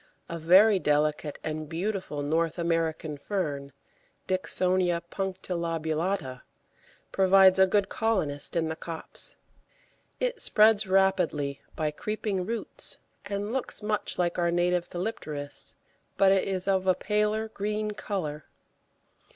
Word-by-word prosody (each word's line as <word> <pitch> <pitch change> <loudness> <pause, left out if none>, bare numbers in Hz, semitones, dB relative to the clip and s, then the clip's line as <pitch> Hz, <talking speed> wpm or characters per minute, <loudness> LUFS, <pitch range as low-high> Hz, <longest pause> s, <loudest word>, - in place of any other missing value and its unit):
A 170 - -5
very 190 +5 +6
delicate 150 -1 0
and 155 -1 -4
beautiful 175 -4 -3
North 160 +3 0
American 165 -3 -1
fern 145 -6 -3 0.6
(Dicksonia 185 -2 +1
punctilobulata) 170 -5 -2 0.7
proves 190 0 +5
a 190 - +7
good 200 0 +2
colonist 185 -12 -1
in 165 -1 +1
the 160 - -3
copse. 165 0 -1 0.8
It - - -1
spreads 215 -1 +5
rapidly 180 -7 +1
by 155 -2 -1
creeping 200 +2 -3
roots, 230 0 -4 0.3
and 205 +2 -3
looks 260 -4 -3
much 210 0 -1
like 175 0 0
our 170 0 +2
native 175 0 +1
Thelipteris, 155 -7 -5 0.4
but 195 -1 +5
is 195 -1 +1
of 190 -1 +1
a 185 - +5
paler 210 +1 0
green 210 0 -2
colour. 165 -8 -4
185 Hz, 115 wpm, -28 LUFS, 160-200 Hz, 0.8 s, a